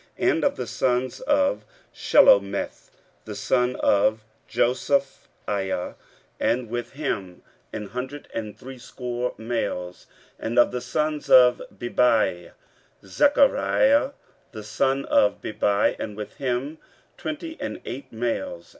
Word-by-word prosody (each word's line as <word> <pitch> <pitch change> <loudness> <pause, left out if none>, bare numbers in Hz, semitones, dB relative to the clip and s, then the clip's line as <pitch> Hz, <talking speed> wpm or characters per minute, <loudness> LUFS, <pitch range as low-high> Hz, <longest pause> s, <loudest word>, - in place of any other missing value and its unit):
15:008:010 - - +3
And - - -1
of - - +2
the - - -4
sons 125 0 -1
of 285 +1 +1 0.3
Shelomith; - - +3 0.4
the - - -7
son 125 -1 +1
of 110 +2 +2 0.2
Josiphiah, 120 -7 -1 0.5
and 120 -2 0
with 120 +1 -4
him 100 - -4 0.3
an 105 -1 -5
hundred 130 +4 -6
and 110 -2 -5
threescore 125 -1 -5
males. 110 -6 -4 0.3
15:008:011 - - -8
And 115 +2 -3
of 120 - +5
the 125 - -3
sons 150 +5 -2
of 125 -1 +7
Bebai; 115 -8 +1 0.5
Zechariah 280 - +3 0.4
the 110 -3 -8
son 135 +6 0
of 105 - +3
Bebai, 105 -1 +1
and 105 -1 -5
with 105 - -8
him 135 +3 -2 0.4
twenty 320 +1 -6
and - - -4
eight 130 +1 -7
males. 110 -7 -3
125 Hz, 120 wpm, -24 LUFS, 110-140 Hz, 0.5 s, of